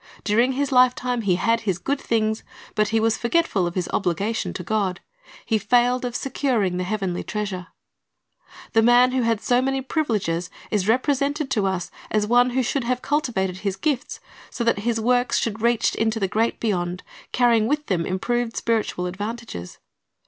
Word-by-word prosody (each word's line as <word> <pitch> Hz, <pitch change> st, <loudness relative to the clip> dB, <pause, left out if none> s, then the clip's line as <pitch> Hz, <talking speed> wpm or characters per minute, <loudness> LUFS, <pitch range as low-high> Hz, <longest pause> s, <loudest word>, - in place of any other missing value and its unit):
During 235 Hz, +5 st, +2 dB
his 280 Hz, +1 st, -1 dB
lifetime 250 Hz, -1 st, +3 dB
he 195 Hz, -4 st, +2 dB
had 230 Hz, +5 st, +2 dB
his. 200 Hz, -6 st, -1 dB
good 275 Hz, +9 st, -2 dB
things, 220 Hz, -1 st, 0 dB, 0.3 s
but 215 Hz, -1 st, +2 dB
he 225 Hz, +2 st, +1 dB
was 220 Hz, 0 st, +1 dB
forgetful 235 Hz, -, +1 dB
of 175 Hz, -, -6 dB
his 180 Hz, -2 st, -1 dB
obligation 200 Hz, +5 st, -1 dB
to 180 Hz, -, -5 dB
God. 195 Hz, -2 st, -1 dB, 0.5 s
He 220 Hz, -2 st, +1 dB
failed 245 Hz, +4 st, +2 dB
of 245 Hz, -1 st, -4 dB
securing 240 Hz, -10 st, 0 dB
the 180 Hz, -, -1 dB
heavenly 190 Hz, -2 st, -2 dB
treasure. 195 Hz, -4 st, -4 dB, 1.1 s
The 225 Hz, -, +5 dB
rich -, -, +2 dB
man 245 Hz, +1 st, +6 dB
who 260 Hz, 0 st, +1 dB
had 230 Hz, -2 st, +1 dB
so 245 Hz, 0 st, +2 dB
many 270 Hz, +1 st, 0 dB
privileges 215 Hz, -, -1 dB, 0.2 s
is 205 Hz, -3 st, 0 dB
represented 280 Hz, +4 st, +1 dB
to 210 Hz, -6 st, +1 dB
us 185 Hz, -2 st, -2 dB, 0.2 s
as 215 Hz, -1 st, +1 dB
one 245 Hz, +3 st, +4 dB
who 255 Hz, +1 st, 0 dB
should 255 Hz, +1 st, -1 dB
have 250 Hz, +1 st, -1 dB
cultivated 225 Hz, -, -1 dB
his 195 Hz, -1 st, -2 dB
gifts, 280 Hz, +2 st, -2 dB, 0.3 s
so 235 Hz, -, -3 dB
that 230 Hz, -3 st, +2 dB
his 225 Hz, +2 st, 0 dB
works 245 Hz, +2 st, +2 dB
should 220 Hz, -1 st, -2 dB
reach 235 Hz, 0 st, +2 dB
to 225 Hz, 0 st, 0 dB
the 195 Hz, -, +1 dB
great 225 Hz, +4 st, 0 dB
beyond, 180 Hz, -5 st, -2 dB, 0.3 s
carrying 235 Hz, -3 st, +3 dB
with 295 Hz, +2 st, 0 dB
them 175 Hz, -4 st, 0 dB
improved 230 Hz, +6 st, -1 dB
spiritual 220 Hz, -6 st, -1 dB
advantages. 205 Hz, -, -6 dB
225 Hz, 180 wpm, -23 LUFS, 195-250 Hz, 1.1 s, man